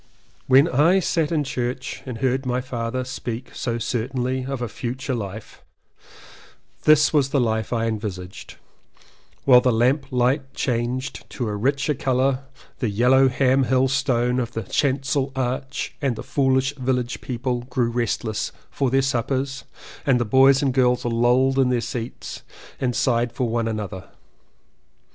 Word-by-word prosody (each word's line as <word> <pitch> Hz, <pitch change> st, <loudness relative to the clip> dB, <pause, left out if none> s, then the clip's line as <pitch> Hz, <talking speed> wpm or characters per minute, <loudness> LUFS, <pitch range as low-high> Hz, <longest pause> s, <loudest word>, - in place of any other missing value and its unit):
When 135 Hz, +4 st, +6 dB
I 165 Hz, +6 st, +4 dB
sat 165 Hz, -3 st, 0 dB
in 155 Hz, -3 st, +1 dB
Church 125 Hz, -1 st, -4 dB
and 125 Hz, -3 st, -5 dB
heard 130 Hz, +1 st, 0 dB
my 125 Hz, -1 st, -1 dB
father 125 Hz, 0 st, -3 dB
speak 125 Hz, -1 st, -6 dB
so 120 Hz, -2 st, -2 dB
certainly 125 Hz, +2 st, -2 dB
of 135 Hz, -1 st, -3 dB
a 120 Hz, -, -2 dB
future 125 Hz, +4 st, -4 dB
life 105 Hz, -2 st, -7 dB, 0.6 s
— -, -, -23 dB
this 155 Hz, 0 st, +5 dB
was 140 Hz, -3 st, +3 dB
the 145 Hz, -, 0 dB
future 125 Hz, -, +3 dB
life 110 Hz, -1 st, -1 dB
I 115 Hz, -2 st, 0 dB
envisaged, 100 Hz, -5 st, -5 dB, 0.9 s
while 125 Hz, -2 st, +7 dB
the 125 Hz, -, +2 dB
lamp 130 Hz, +5 st, +2 dB
light 130 Hz, +2 st, 0 dB
changed 125 Hz, +2 st, -2 dB
to 120 Hz, -, -4 dB
a 105 Hz, -, -2 dB
richer 140 Hz, +7 st, 0 dB
colour 130 Hz, 0 st, 0 dB, 0.3 s
the 120 Hz, -, 0 dB
yellow 125 Hz, +6 st, +4 dB
Ham 130 Hz, +1 st, +2 dB
Hill 130 Hz, +2 st, +3 dB
stone 125 Hz, -2 st, +1 dB
of 120 Hz, -1 st, -3 dB
the 115 Hz, -, -3 dB
Chancel 135 Hz, +4 st, 0 dB
arch 130 Hz, +1 st, -3 dB
and 135 Hz, -4 st, 0 dB
the -, -, -7 dB
foolish 135 Hz, 0 st, +1 dB
village 125 Hz, -1 st, -1 dB
people 125 Hz, 0 st, -2 dB
grew 125 Hz, -2 st, -1 dB
restless 115 Hz, -2 st, -2 dB, 0.2 s
for 135 Hz, -, 0 dB
their 135 Hz, +2 st, +2 dB
suppers 135 Hz, +1 st, -1 dB, 0.4 s
and 135 Hz, -5 st, +3 dB
the 120 Hz, -, 0 dB
boys 135 Hz, +4 st, +5 dB
and 135 Hz, -2 st, +1 dB
girls 125 Hz, -1 st, +2 dB
lolled 125 Hz, +3 st, +2 dB
in 130 Hz, -2 st, +4 dB
their 125 Hz, -1 st, +2 dB
seats 115 Hz, 0 st, -6 dB, 0.4 s
and 125 Hz, -2 st, -1 dB
sighed 120 Hz, -1 st, +1 dB
for 125 Hz, 0 st, -1 dB
one 115 Hz, 0 st, -1 dB
another. 105 Hz, -4 st, -5 dB
125 Hz, 155 wpm, -23 LUFS, 120-135 Hz, 0.9 s, while